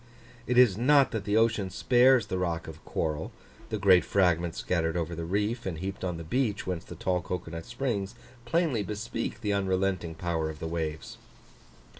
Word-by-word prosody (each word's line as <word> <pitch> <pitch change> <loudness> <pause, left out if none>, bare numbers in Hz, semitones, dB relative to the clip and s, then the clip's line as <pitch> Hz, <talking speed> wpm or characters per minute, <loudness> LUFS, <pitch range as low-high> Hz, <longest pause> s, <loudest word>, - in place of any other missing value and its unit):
It 125 - +1
is 115 -6 +6
not 140 +2 +5
that 110 -3 -3
the 105 +1 +2
ocean 110 -4 +2
spares 125 +4 +4
the 95 -2 -3
rock 85 -2 -2
of 80 -1 -10
coral; 80 -1 -2 0.4
the 110 - -2
great 95 -3 +5
fragments 85 -3 +1
scattered 85 -2 0
over 85 0 -2
the 85 0 -4
reef, 105 +6 -1
and 85 -4 -3
heaped 95 +3 -5
on 90 -2 -2
the 85 - -6
beach, 105 +4 -1
whence 90 -3 -3
the - - -10
tall 90 -1 0
cocoa 90 -2 -5
nut 85 0 -6
springs, 120 -4 -3 0.3
plainly 150 -3 +1
bespeak 115 +3 -4
the 105 -3 0
unrelenting 95 -3 0
power 80 -1 -2
of 80 - -7
the 80 - -6
waves. 80 +7 -4
95 Hz, 185 wpm, -28 LUFS, 85-115 Hz, 0.4 s, is